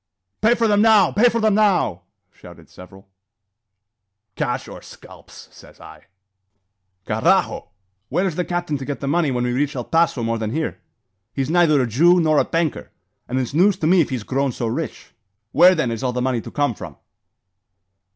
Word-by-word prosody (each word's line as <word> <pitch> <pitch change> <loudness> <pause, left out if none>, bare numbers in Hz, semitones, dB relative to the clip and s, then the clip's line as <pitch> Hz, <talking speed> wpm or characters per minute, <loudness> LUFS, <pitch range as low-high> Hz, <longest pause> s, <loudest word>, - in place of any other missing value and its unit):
"Pay 230 +3 +4
for 230 -1 +1
them 205 -1 +3
now! 215 -5 +5
Pay 235 +4 +4
for 230 0 -2
them 215 -1 +2
now!" 190 - +1 0.3
shouted - - -16
several. 95 +2 -15 1.3
"Cash - - -3
or - - -10
scalps, - - -15
says - - -18
I." - - -14 1.0
"Carrajo! 165 - 0 0.4
where 180 - 0
is 180 -5 -2
the 180 - -1
captain 175 -4 -3
to 135 - -6
get 145 0 -5
the 140 - -5
money 160 +1 +1
when 125 -2 -1
we 125 0 -1
reach 140 +3 -1
El 125 - -3
Paso 165 -4 0
more 115 0 -2
than 110 0 -4
here? 160 +1 -4 0.5
He's 135 +2 -2
neither 165 -4 +3
a 130 - +1
Jew 170 - +4
nor 155 -3 +2
a - - +3
banker; 165 -2 -2 0.4
and 125 - -3
it's 130 -1 -3
news 185 +5 +3
to - - -3
me 175 +2 +4
if 155 - -1
he's 125 -4 -4
grown 135 +3 -1
so 120 - -5
rich. 125 +8 -5 0.4
Where, 185 +5 +6
then, 145 -8 -1
is 115 - -5
all 125 -2 -2
the 125 - -2
money 125 -2 -1
to - - -11
some 145 -4 +1
from?" - - -10
150 Hz, 190 wpm, -20 LUFS, 125-180 Hz, 1.3 s, Where